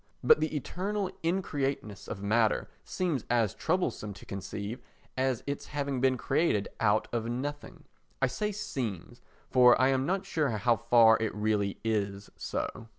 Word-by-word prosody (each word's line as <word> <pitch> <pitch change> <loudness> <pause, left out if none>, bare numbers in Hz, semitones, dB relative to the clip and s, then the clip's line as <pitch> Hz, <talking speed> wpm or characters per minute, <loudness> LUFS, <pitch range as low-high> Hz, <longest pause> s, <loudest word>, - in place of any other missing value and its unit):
But - - +6
the 155 0 -1
eternal 190 - -2
increateness 140 - -2
of 100 - -6
matter 110 +1 +2 0.2
seems 170 -9 -1
as 115 -4 +2
troublesome 160 - -1
to - - -13
conceive 100 +4 -5 0.4
as 130 -2 0
its 140 0 -4
having 140 -3 -2
been 130 -1 +3
created 135 -7 +1
out 110 0 +2
of 115 -1 -1
nothing. 140 +5 -5 0.4
I 135 - +3
say 210 +12 -2
"seems," 120 - -5 0.3
for 125 -2 +6
I 130 +1 +4
am 135 0 +1
not 190 +2 0
sure 150 -3 0
how 115 +2 +2
far 115 -1 +6
it 110 -2 -1
really 105 -2 0
is 100 -3 -2
so. 115 - -4
125 Hz, 150 wpm, -30 LUFS, 110-145 Hz, 0.4 s, But